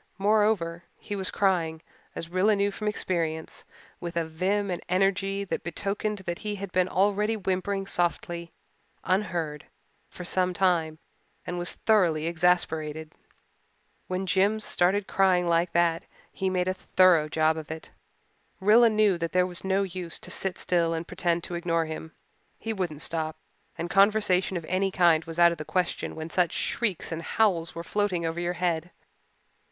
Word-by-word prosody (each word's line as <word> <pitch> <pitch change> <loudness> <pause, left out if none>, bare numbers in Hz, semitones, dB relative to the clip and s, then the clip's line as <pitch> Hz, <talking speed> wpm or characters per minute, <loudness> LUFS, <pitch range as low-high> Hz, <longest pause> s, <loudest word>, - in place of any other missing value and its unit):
Moreover, 200 -5 +2
he 205 - -6
was 190 -2 -1
crying, 165 -5 0 0.3
as 165 - -4
Rilla 185 +5 +2
knew 200 0 +1
from 210 +2 -5
experience, 165 -6 -2 0.4
with 170 -1 -5
a 165 - +1
vim 190 +5 -1
and 175 - -3
energy 195 +1 +1
that 195 - -3
betokened 200 +4 -3
that 175 0 -3
he 210 -1 -3
had 200 -1 -6
been 185 0 +2
already 205 +3 +2
whimpering 195 0 -1
softly 175 -2 -2 0.5
unheard 170 -6 -1 0.4
for 180 - -9
some 180 0 +1
time 170 -5 +1 0.5
and 175 - -4
was 175 - -4
thoroughly 175 -8 +2
exasperated. 160 -2 0 0.9
When 185 +1 -2
Jims 200 +4 +2
started 190 +4 +2
in - - -15
crying 185 -2 +3
like 170 +1 +2
that 170 0 +2 0.3
he 190 - -1
made 180 -1 0
a 185 - +1
thorough 185 -4 +3
job 155 0 +2
of 155 -2 -7
it. 160 0 -8 0.7
Rilla 220 +4 +6
knew 210 -4 +3
that 165 0 -3
there 180 0 +4
was 180 -1 -7
no 190 +1 +1
use 180 -3 -4
to - - -6
sit 190 -1 -1
still 170 -2 +1
and 165 +1 -4
pretend 175 -2 -1
to - - -7
ignore 170 -1 0
him. 160 0 -7 0.5
He 225 - -4
wouldn't 175 -7 -2
stop; 160 -1 -2 0.4
and 170 - -3
conversation 195 -1 +3
of 165 - -6
any 185 +3 0
kind 170 -4 +3
was 165 0 -8
out 170 0 +6
of 170 - -5
the - - -3
question 180 +2 -2
when 160 +1 -6
such 180 -3 +2
shrieks 210 -9 -1
and 165 0 -3
howls 170 -3 +1
were 170 - -5
floating 185 -3 -1
over 165 +1 -2
your 175 0 -1
head. 175 -1 -1
180 Hz, 170 wpm, -27 LUFS, 165-195 Hz, 0.9 s, Rilla